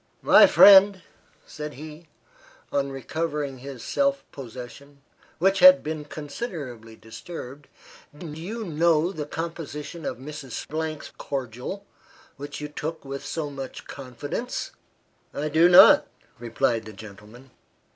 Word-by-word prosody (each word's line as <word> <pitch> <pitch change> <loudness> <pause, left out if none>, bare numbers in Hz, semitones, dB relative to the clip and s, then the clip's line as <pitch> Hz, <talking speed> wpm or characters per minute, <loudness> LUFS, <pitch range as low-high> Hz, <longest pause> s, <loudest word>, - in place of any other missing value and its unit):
"My - - +8
friend," 195 -2 +7 0.4
said 150 -1 -8
he, 155 +3 -11 0.6
on 140 -1 -1
recovering 145 0 -4
his 130 -2 -9
self 280 0 0
possession, 135 +2 -11 0.3
which 195 +2 +2
had 275 0 +8
been 155 -1 -5
considerably 145 - -7
disturbed, 130 +4 -10 0.5
"Do 170 - -10
you 200 +9 -6
know 165 -1 +1
the 150 -6 -6
composition 165 0 -6
of 130 - -4
Mrs. 135 -1 -9 0.5
's - - -11
cordial, 135 - -5 0.5
which 145 +1 -8
you 150 - -5
took 155 +1 -6
with 135 0 -6
so 155 -3 -4
much 135 -1 -8
confidence?" 145 - -6 0.6
"I 150 +1 -2
do 160 +3 +5
not!" 180 - +8 0.3
replied 115 -1 -1
the 110 - -10
gentleman. 110 +5 -14
150 Hz, 120 wpm, -25 LUFS, 130-165 Hz, 0.6 s, My